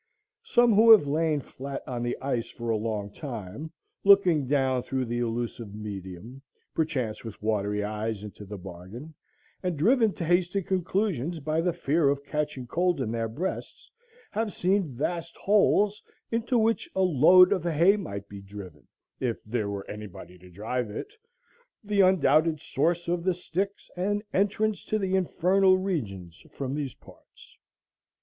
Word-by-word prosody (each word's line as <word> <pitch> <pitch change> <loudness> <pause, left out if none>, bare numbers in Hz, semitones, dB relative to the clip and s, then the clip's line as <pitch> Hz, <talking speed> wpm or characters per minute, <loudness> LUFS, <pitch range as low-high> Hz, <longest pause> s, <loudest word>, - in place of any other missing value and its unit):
Some 240 - +4
who 220 +3 +6
have 220 -8 +9
lain 155 0 +1
flat 135 +1 -7
on 125 -2 -3
the 120 0 -2
ice 120 -4 -1
for 120 -1 -4
a - - +2
long 105 -2 -3
time, 125 - -7 0.3
looking 185 -8 +5
down 130 -2 +2
through 130 +1 -2
the 120 +1 -2
illusive 115 -2 -3
medium, 105 +3 -8 0.3
perchance 130 -9 -2
with 110 -3 -8
watery 105 -1 -1
eyes 105 0 -3
into 105 0 -9
the 105 +1 -7
bargain, 95 - -10 0.5
and 180 -4 -2
driven 225 - +4
to 175 - -4
hasty 175 +3 +1
conclusions 180 - -1
by 155 +2 0
the 175 +1 +1
fear 155 -2 +1
of 140 0 -1
catching 150 -3 -3
cold 175 +4 0
in 120 -4 -2
their 115 -1 -1
breasts, 185 - -5 0.4
have 220 -1 -1
seen 185 -3 +1
vast 170 +5 -3
holes 205 0 +3 0.3
"into 235 +2 +1
which 225 0 +1
a 190 - +2
load 180 +3 +7
of 185 -5 -2
hay 170 +4 +4
might 100 - -6
be 100 -1 -9
driven," 95 -6 -11 0.3
if 120 -3 -2
there 105 -2 -2
were 100 -1 -5
any 105 0 -7
body 90 -1 -12
to 90 +1 -15
drive 110 +6 -3
it, 110 - -7 0.7
the 205 -1 +2
undoubted 165 -4 +4
source 170 +6 0
of 170 0 -1
the 185 -1 +1
Styx 195 +3 -3
and 205 +3 -1
entrance 205 +2 +1
to 215 - 0
the 190 -2 0
Infernal 185 +1 +3
Regions 100 - -4
from 135 -1 -4
these 145 -3 -3
parts. - - -18
150 Hz, 160 wpm, -27 LUFS, 110-185 Hz, 0.7 s, have